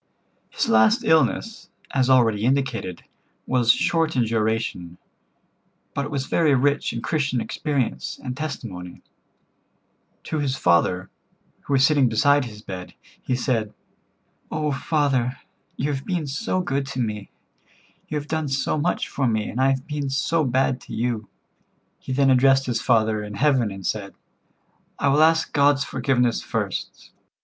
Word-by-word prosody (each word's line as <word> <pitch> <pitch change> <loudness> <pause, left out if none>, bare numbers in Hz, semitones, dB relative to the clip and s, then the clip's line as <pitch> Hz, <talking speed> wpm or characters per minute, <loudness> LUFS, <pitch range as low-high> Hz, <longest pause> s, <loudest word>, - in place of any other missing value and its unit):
'" - - -43
His - - -1
last 110 -1 +4
illness, 160 +7 +1 0.2
as 130 -1 +1
already 115 -5 +4
indicated, 125 -8 -1 0.4
was 125 -3 +4
short 160 +4 +1
in 125 - +3
duration, 110 -6 -2 1.0
but 140 - -2
it - - -6
was 140 -3 -2
very 155 -2 +3
rich 140 +3 +1
in 115 - -5
Christian 145 -5 0
experience 140 +1 -2
and 125 -1 -4
testimony. 115 - -6 1.2
To 155 - -3
his 135 -2 -1
father, 90 -1 +1 0.5
who 145 - -4
was 135 0 +5
sitting 140 -4 +3
beside 145 +5 +3
his 105 -2 -10
bed, 90 -1 -8 0.3
he 125 - -1
said: 115 -4 -1 0.7
"Oh, 150 -1 -1
father, 135 -3 0 0.4
you 145 +3 -1
have 135 0 -4
been 175 -3 -2
so 185 +7 -2
good 140 -6 -2
to 135 -1 -5
me. 105 -4 -3 0.8
You 155 - -3
have 145 0 -5
done 160 -1 -2
so 135 +3 -1
much 175 +4 0
for 135 -2 -1
me, 110 -2 -1
and 125 - -2
I 135 - +4
have 135 -1 -1
been 145 -2 -3
so 155 +4 +1
bad 130 0 +1
to - - -8
you." 115 -2 -2 0.7
He - - -8
then 135 +1 +3
addressed 135 +1 +4
his 120 -2 -1
Father 110 -3 +2
in 105 0 -7
heaven 130 -4 +2
and 95 -1 -8
said: 100 -2 -3 0.8
"I 140 - +1
will 145 +3 +4
ask 160 0 +3
God's 140 -1 +4
forgiveness 125 -5 0
first. - - -4
130 Hz, 155 wpm, -23 LUFS, 115-145 Hz, 1.2 s, was